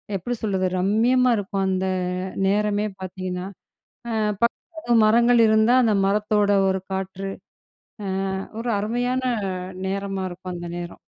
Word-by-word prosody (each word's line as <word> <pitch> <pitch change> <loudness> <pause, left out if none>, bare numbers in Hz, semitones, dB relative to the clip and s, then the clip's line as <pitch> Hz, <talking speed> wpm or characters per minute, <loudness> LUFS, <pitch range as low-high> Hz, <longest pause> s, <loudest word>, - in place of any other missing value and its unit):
எப்படி 240 +7 -2
சொல்றது? 190 -3 0
ரம்மியமா 240 +6 +3
இருக்கும். 195 -1 -2
அந்த 190 0 0 0.6
நேரமே 210 +1 +1
பார்த்தீங்கன்னா, 185 -1 -5 0.6
ஆ, - - -2 0.3
பக் 235 0 +3 0.5
மரங்கள் 235 +2 +5
இருந்தா 220 +2 +4
அந்த 220 -3 +3
மரத்தோட 210 0 +2 0.2
ஒரு 190 0 +1
காற்று. 190 0 -4 1.1
ஆ, - - -2 0.2
ஒரு 235 0 -2
அருமையான 245 +4 -1 0.6
நேரமா 195 0 -2
இருக்கும். 180 +1 -7
அந்த 175 0 -6
நேரம். 175 0 -7
200 Hz, 120 wpm, -23 LUFS, 190-225 Hz, 1.1 s, மரங்கள்